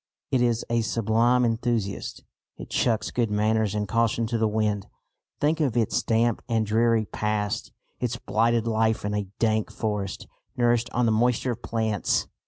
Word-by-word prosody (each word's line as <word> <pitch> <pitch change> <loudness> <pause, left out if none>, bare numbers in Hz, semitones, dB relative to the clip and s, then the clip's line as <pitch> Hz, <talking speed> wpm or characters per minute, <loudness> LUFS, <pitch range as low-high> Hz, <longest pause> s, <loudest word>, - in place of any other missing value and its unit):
It 130 - +2
is 120 -2 +1
a 115 0 +1
sublime 115 +3 +2
enthusiast. 115 -3 -2 0.3
It - - -10
chucks 115 -3 +1
good 120 -3 0
manners 105 0 +1
and 105 -1 -1
caution 115 +2 +1
to 115 +1 -1
the 110 - +3
wind. 105 -2 -1 0.5
Think 155 +2 +1
of 135 -6 +1
its 115 -3 +1
damp 115 0 +1
and 110 -1 +1
dreary 115 +1 +2
past, 105 -1 -2 0.3
its - - -2
blighted 115 +1 +1
life 110 -1 +1
in 105 - -1
a 105 -1 -2
dank 110 -2 +1
forest, 105 -3 -3 0.3
nourished 120 -1 +2
on 125 0 +1
the 115 - +3
moisture 120 +3 +2
of 120 0 -6
plants! 110 -4 0
115 Hz, 165 wpm, -25 LUFS, 105-120 Hz, 0.5 s, the